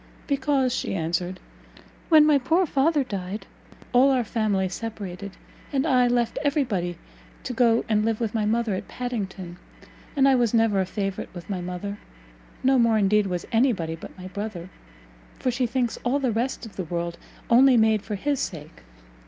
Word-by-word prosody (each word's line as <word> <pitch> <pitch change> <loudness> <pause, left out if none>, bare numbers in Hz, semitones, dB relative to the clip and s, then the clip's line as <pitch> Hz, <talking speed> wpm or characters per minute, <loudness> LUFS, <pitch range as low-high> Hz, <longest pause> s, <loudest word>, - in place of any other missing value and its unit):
"Because," 275 -2 +1
she 225 - -2
answered, 175 +2 -2 0.7
"when 310 -2 +7
my 300 -2 +5
poor 325 +8 +2
father 290 0 +2
died 200 -3 -5 0.5
all 255 +3 +6
our 260 -2 +2
family 210 -4 0
separated, 200 -2 -6 0.4
and 275 0 +1
I 255 -5 +4
left 240 -1 0
every 290 0 +2
body 175 -8 -2 0.5
to - - -4
go 235 -1 +3
and 215 -1 +2
live 225 -1 0
with 225 -3 -2
my 220 -2 0
mother 225 0 +1
at 185 - -4
Padington; 195 -8 -5 0.6
and 275 -1 +4
I 270 - +5
was 240 -3 +2
never 225 -4 +3
a 185 - -2
favourite 195 0 -3
with 175 +3 -8
my 185 -2 -2
mother 180 +3 -5 0.6
no 265 0 +4
more, 230 -2 +4
indeed, 210 0 +3
was 180 -2 -3
any 245 +3 +4
body 165 -4 -4
but 165 - -11
my 185 0 -8
brother, 190 -3 -6 0.7
for 255 - 0
she 250 0 0
thinks 240 -1 -1
all 245 +3 +1
the 265 -4 0
rest 240 +3 -2
of 220 - -12
the 185 - -2
world 170 +1 -4 0.3
only 255 +2 +6
made 220 -2 +3
for 210 0 -4
his 285 +7 -1
sake. 155 -4 -6
225 Hz, 180 wpm, -25 LUFS, 190-255 Hz, 0.7 s, when